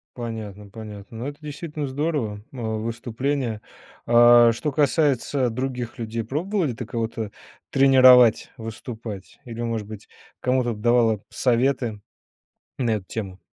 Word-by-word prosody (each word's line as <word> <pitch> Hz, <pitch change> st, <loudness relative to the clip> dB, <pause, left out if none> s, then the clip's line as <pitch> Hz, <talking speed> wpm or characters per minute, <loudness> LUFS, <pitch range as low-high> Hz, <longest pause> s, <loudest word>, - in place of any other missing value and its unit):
Понятно, 110 Hz, -4 st, -6 dB
понятно. 105 Hz, 0 st, -10 dB
Ну, 125 Hz, -, -4 dB
это 145 Hz, 0 st, -7 dB
действительно 150 Hz, 0 st, -5 dB
здорово, 135 Hz, -7 st, -2 dB
а 130 Hz, -, -10 dB, 0.2 s
выступление 115 Hz, +1 st, -2 dB, 0.4 s
А, 120 Hz, 0 st, +7 dB
а, -, -, +4 dB
что 145 Hz, +6 st, -3 dB
касается 140 Hz, -2 st, +1 dB
других 125 Hz, 0 st, -4 dB
людей, 115 Hz, 0 st, -3 dB
пробовала 160 Hz, -, -1 dB
ты 120 Hz, 0 st, -6 dB
кого-то 115 Hz, -2 st, -3 dB, 0.4 s
тренировать 130 Hz, -3 st, +6 dB
выступать 110 Hz, -2 st, -8 dB
или, 120 Hz, -1 st, -6 dB
может 115 Hz, -3 st, -3 dB
быть, 110 Hz, -2 st, -10 dB, 0.3 s
кому-то 125 Hz, -2 st, +1 dB
давала 115 Hz, -1 st, +3 dB
советы 125 Hz, -3 st, +1 dB, 0.8 s
на 120 Hz, -3 st, +1 dB
эту 95 Hz, -3 st, -5 dB
тему? 95 Hz, -4 st, -6 dB
120 Hz, 125 wpm, -24 LUFS, 110-135 Hz, 0.8 s, А